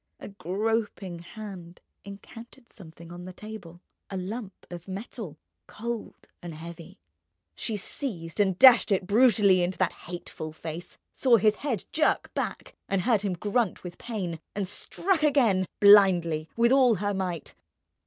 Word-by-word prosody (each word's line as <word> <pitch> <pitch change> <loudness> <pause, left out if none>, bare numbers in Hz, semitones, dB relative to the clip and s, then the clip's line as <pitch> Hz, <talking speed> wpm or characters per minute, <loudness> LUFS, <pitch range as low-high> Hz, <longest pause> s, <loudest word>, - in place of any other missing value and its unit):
A - - -8
groping 200 -1 -2
hand 180 -2 -10 0.2
encountered 230 +5 -12
something 170 -3 -13
on 175 0 -9
the 185 - -8
table, 190 -4 -10 0.3
a 195 - -4
lump 195 +2 -6
of 175 +1 -8
metal, 195 - -7 0.3
cold 235 +1 -6
and 170 -2 -7
heavy. 170 +1 -10 0.6
She 220 -3 -3
seized 185 - -5
and 190 -3 +2
dashed 245 -2 +7
it 195 -1 +1
brutally 205 -3 +4
into 180 +1 -1
that 185 - +1 0.2
hateful 155 -3 -7
face, 165 +2 -8 0.2
saw 250 -3 +4
his 215 +1 +3
head 255 -9 -3
jerk 310 - +1
back - - -4
and 195 -2 0
heard 225 -4 +2
him 200 -3 -1
grunt 205 +4 -1
with 175 -1 -9
pain, 185 -8 -4 0.2
and 200 -2 -2
struck 340 - -1
again, 240 - +3
blindly, 175 -6 +6
with 235 +1 +4
all 260 -4 +5
her 205 +2 -1
might. 180 -4 -4
195 Hz, 145 wpm, -27 LUFS, 175-225 Hz, 0.6 s, dashed